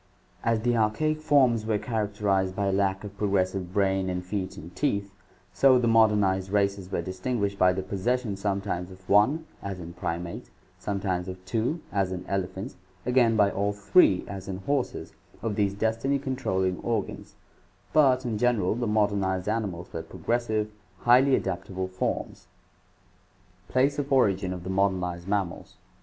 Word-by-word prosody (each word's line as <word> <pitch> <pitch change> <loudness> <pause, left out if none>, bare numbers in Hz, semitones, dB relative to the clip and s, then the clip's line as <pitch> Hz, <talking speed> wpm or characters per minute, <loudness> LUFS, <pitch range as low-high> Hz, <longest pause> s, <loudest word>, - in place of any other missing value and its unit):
As 115 -1 +1
the 120 +1 +1
archaic 155 +8 +1
forms 130 -7 +4
were 110 -1 0
characterized 105 -4 -1
by 100 -1 0
lack 95 0 0
of 100 -1 -8
progressive 95 -3 0
brain 95 -1 +1
and 90 0 -3
feet 95 0 -4
and 85 +3 -10
teeth, 100 -9 -1 0.4
so 135 -2 +5
the 120 -1 +1
modernized 105 -4 +3
races 100 -2 0
were - - -1
distinguished 100 +1 -2
by 90 0 +6
the 95 +1 -3
possession 105 +3 -1
sometimes 100 -2 -2
of 95 0 -15
one 130 +11 +4 0.5
(primates), 85 0 -4 0.3
sometimes 95 -2 -2
of 95 0 -8
two 120 - -1
(elephants), 95 +2 -2 0.3
again 125 -2 +3
by 100 -2 +4
all 100 +1 0
three 100 - +4
(horses) 100 +8 -3 0.3
of 115 -2 -1
these 100 -2 +1
destiny 115 +6 0
controlling 95 -10 -1
organs, 115 -4 -3 0.6
but 130 -4 +4
in 110 -3 -2
general 115 -6 +2
the 120 +1 -2
modernized 100 -3 +1
animals 100 -5 -3
were 80 - -3
progressive, 110 +1 -2 0.3
highly 130 +3 +5
adaptable 95 0 -3
forms. 95 0 -3 1.2
Place 135 +3 +2
of 140 -1 -3
Origin 100 -8 +3
of 90 -1 -5
the 95 - -4
Modernized 90 -2 0
Mammals. 100 -3 -2
100 Hz, 140 wpm, -27 LUFS, 95-115 Hz, 1.2 s, by